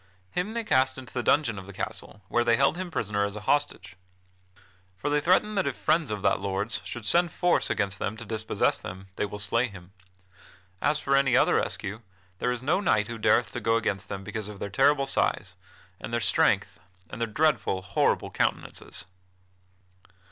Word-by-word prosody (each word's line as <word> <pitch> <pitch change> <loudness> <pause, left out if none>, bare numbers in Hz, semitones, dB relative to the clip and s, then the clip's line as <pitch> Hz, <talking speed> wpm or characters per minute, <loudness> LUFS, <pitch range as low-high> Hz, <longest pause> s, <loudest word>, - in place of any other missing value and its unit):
Him 190 +5 -2
they 235 0 -2
cast 130 -9 +2
into 130 -1 -10
the 125 - -1
dungeon 120 -5 +2
of 95 - -11
the 100 - -9
castle, 105 +2 -6
where 120 - +2
they 120 -1 +4
held 140 +3 +3
him 185 0 -4
prisoner 105 -9 -1
as 100 0 -2
an 105 - -7
hostage. 145 -5 0 1.0
For 120 +11 -2
they 150 0 +2
threaten 185 +6 +3
that 195 -2 0
if - - -2
friends 155 -3 +1
of 105 -2 -4
that - - +3
lord's 100 +3 -2
should 120 -3 -6
send 175 +4 +3
force 175 -1 +2
against 100 -1 -1
them 110 +3 -3
to 115 - -8
dispossess 110 +1 0
them, 95 +2 -8
they 105 - -1
will 105 - -7
slay 115 +4 +1
him. 95 -4 -13 0.9
As 150 +1 +2
for 140 -1 +1
any 135 -2 +4
other - - +4
rescue, 105 +4 -3 0.4
there 125 - +1
is 125 0 -4
no 165 +8 +2
knight 110 - +2
who 115 -1 -5
dareth - - +3
to - - -4
go 115 0 +2
against 100 -4 -1
them 95 0 -5
because 105 +1 -5
of 105 - -9
their 100 - -5
terrible 140 +5 +3
size, 95 -8 0 0.4
and - - -7
their 120 - +1
strength, 110 - +2 0.3
and 110 - -8
their 115 - +1
dreadful, 115 -7 +1
horrible 100 0 +1
countenances." - - -2
115 Hz, 195 wpm, -27 LUFS, 100-145 Hz, 1.0 s, they